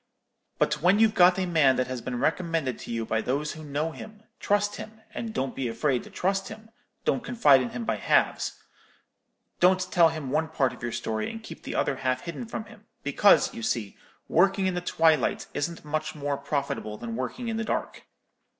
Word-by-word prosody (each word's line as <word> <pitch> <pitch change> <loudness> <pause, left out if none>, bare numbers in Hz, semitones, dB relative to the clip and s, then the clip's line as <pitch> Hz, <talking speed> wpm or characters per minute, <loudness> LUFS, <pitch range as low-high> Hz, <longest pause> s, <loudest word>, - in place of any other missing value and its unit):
But - - +1
when 180 +4 +5
you've 220 -1 +4
got 180 -2 +6
a 190 - 0
man 155 -7 +4
that 130 - +1
has 130 -1 -5
been 125 0 -4
recommended 160 -2 0
to - - -8
you 115 -1 -2
by 110 0 0
those 145 +5 -1
who 155 - -9
know 150 +2 -2
him, 215 +6 -11 0.2
trust 205 0 +1
him, 220 0 -9
and 230 0 -4
don't 135 -10 -2
be 135 -2 -2
afraid 125 +2 0
to - - -12
trust 195 +1 -1
him, 220 +1 -11 0.3
don't 250 - +1
confide 150 - +5
in 125 - -2
him 120 -1 -5
by - - 0
halves; - - +1 1.0
don't 185 +1 +5
tell 170 -2 +6
him 155 -5 -5
one 160 +2 +1
part 135 -5 0
of - - -13
your 120 -1 -3
story, 110 -2 -2
and 225 0 -8
keep - - -10
the - - -6
other 135 - 0
half 130 -1 -1
hidden 175 +7 -6
from 220 -1 -5
him; 210 0 -16 0.2
because, 205 - +4
you 230 - -7
see, 115 - -2 0.3
working 195 +3 +3
in 185 - +1
the 180 - -2
twilight 160 -5 +2
isn't 165 +2 -3
much 155 +1 -2
more 145 -1 -2
profitable 140 -6 -3
than 115 0 -5
working 130 - -4
in 225 -1 -2
the 225 - -1
dark. - - -3
155 Hz, 205 wpm, -27 LUFS, 130-195 Hz, 1.0 s, got